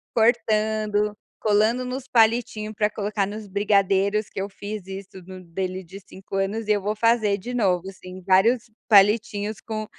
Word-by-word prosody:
cortando, 215 -2 +1 0.3
colando 220 +4 +2
nos 255 +1 -5
palitinho 225 -2 +2
pra 210 0 +1
colocar 205 -1 -2
nos 210 +1 -7
brigadeiros, 200 +1 +1
que - - -6
eu 200 - -2
fiz 205 -1 -7
isso 190 -1 -9
no 185 -1 -10
dele 185 +2 -4
de 190 +3 -11
5 195 +1 -7
anos 205 +3 -2
e - - +2
eu 205 -1 +2
vou 210 +2 -2
fazer 220 -2 +2
de 245 +6 -7
novo, 190 -5 0
sim, 185 0 -11
vários 220 +5 +3 0.2
palitinhos 210 0 +3
com 215 -1 -5
210 Hz, 160 wpm, -24 LUFS, 195-220 Hz, 0.3 s, vários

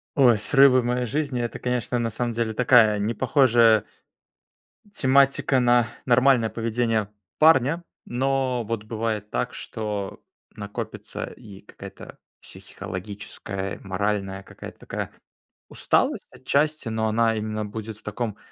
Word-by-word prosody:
Ой, 120 -6 +5
срывы 135 +2 +5
в - - -6
моей 125 0 0
жизни- 140 -1 -2
это, 120 - -4
конечно, 125 -1 -1
на 115 -1 -1
самом 120 +1 -2
деле 115 -1 -1
такая 115 -3 +5
непохожая 115 0 +3 1.1
тематика 135 -3 +3
на 120 -1 +4 0.2
нормальное 125 -2 +4
поведение 115 -2 -1 0.3
парня. 160 +1 +4 0.2
Но 130 -1 0
вот 110 -1 -4
бывает 110 -2 -3
так, - - -2
что 105 -3 -5 0.3
накопится 100 -1 -6
и 100 -3 -12
какая-то - - -12 0.2
психологическая 100 0 -7
и - - -14
моральная 95 0 -2
какая-то 95 - -12
такая - - -5 0.6
усталость - - 0
отчасти. 145 0 0
Но 110 0 -1
она 115 +1 +2
именно 110 0 -3
будет 110 +1 -7
в - - -20
таком 115 -4 -4
115 Hz, 125 wpm, -24 LUFS, 105-125 Hz, 1.1 s, Ой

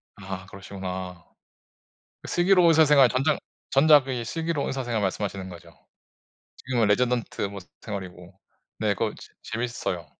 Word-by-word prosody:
아 95 -1 -7
그러시구나. 95 -2 -7 1.0
그 - - -9
슬기로운 180 0 +4
의사 160 -1 +6
생활 140 -3 +6
전작 135 +5 +1 0.3
전작의 135 -4 +4
슬기로운 165 +2 -2
의사 135 -1 -3
생활 115 -3 -1
말씀하시는 95 -1 -3
거죠? 85 -2 -12 0.9
지금은 120 -3 0
레지던트 120 +2 0
뭐 100 0 -3 0.2
생활이고. 95 -3 -8 0.4
네, 105 -2 +1
그거 110 +1 -1
재 - - -14
재밌어요. 110 -7 -4
110 Hz, 325 characters per minute, -25 LUFS, 95-135 Hz, 1.0 s, 의사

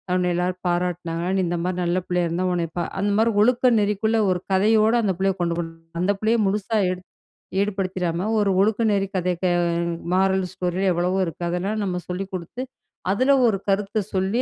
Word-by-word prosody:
உன்ன 180 -1 +1
எல்லாரும் 180 +1 -1
பாராட்டுனாங்களா? 175 -1 -1
நீ - - +2
இந்த 175 0 -1
மாதிரி 180 0 -2
நல்ல 175 +1 0
புள்ளையா 180 -1 0
இருந்தா 170 +3 -1
உன்ன 175 -1 0
பா 175 - +1 0.2
அந்த 205 +1 +1
மாதிரி 225 +1 +3
ஒழுக்க 250 +3 +4
நெறிக்குள்ள 210 +2 +1
1 180 -1 +1
கதையோட 215 +3 +4
அந்த 195 - +1
புள்ளைய 195 0 +1
கொண்டு 170 -1 0
போகணும். 165 -1 -6 0.2
அந்தப் 195 +2 +1
புள்ளைய 225 +2 +2
முழுசா 210 +3 0
எடு 185 0 -5 0.6
ஈடுபடுத்திடாம 185 -2 -1
1 205 -1 +2
ஒழுக்க 220 +2 +2
நெறி 195 -1 +1
கதை 180 0 0 0.8
மாரல் 190 0 +2
ஸ்டோரி 180 +1 -2
எவ்வளவோ 180 +2 0
இருக்கு. 165 0 -7
அதெல்லாம் 195 +5 -2
நம்ம 180 -2 -2
சொல்லிக் 190 +2 -4
குடுத்து, 185 +8 -5 0.5
அதுல 260 +7 +3
1 195 -4 +1
கருத்த 200 +2 0
சொல்லி 190 +5 +1
190 Hz, 175 wpm, -23 LUFS, 180-205 Hz, 0.8 s, ஒழுக்க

